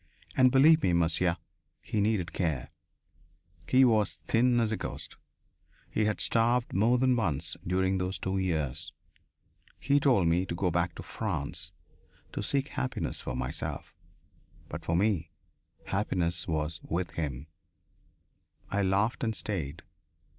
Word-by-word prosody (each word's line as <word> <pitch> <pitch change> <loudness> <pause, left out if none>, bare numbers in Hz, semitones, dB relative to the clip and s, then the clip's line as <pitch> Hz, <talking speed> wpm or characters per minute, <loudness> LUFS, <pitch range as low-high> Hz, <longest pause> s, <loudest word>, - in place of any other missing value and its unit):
"And 130 -1 +5
believe 155 +5 +6
me, 90 - +2
monsieur, 85 +1 +2 0.4
he 105 - -2
needed 100 -5 0
care! 80 -9 -2 1.0
He 130 +1 +6
was 110 -5 +2
thin 120 +1 +2
as 115 -2 +1
a - - +1
ghost. - - -5 0.8
He 110 - +1
had 105 -1 0
starved 120 +1 +2
more 115 +6 +3
than 130 0 +3
once 80 - -1
during 95 +1 +1
those 90 +1 -2
two 95 +1 -2
years. 80 -5 -2 0.9
He 140 +1 +3
told 125 - +3
me 90 +3 +2
to 85 - -3
go 90 0 0
back 85 0 0
to - - -8
France, - - -3 0.6
to - - -3
seek 140 +7 0
happiness 130 - -2
for 65 - -4
myself. 65 +5 -4 0.7
But - - -6
for - - 0
me 90 -4 +1 0.6
happiness 85 -4 0
was 80 0 -1
with 85 +2 -3
him. 70 -4 -4 1.3
I 100 - +1
laughed 100 +6 +1
and 110 -2 0
stayed. 85 -7 -4
95 Hz, 140 wpm, -29 LUFS, 85-115 Hz, 1.3 s, believe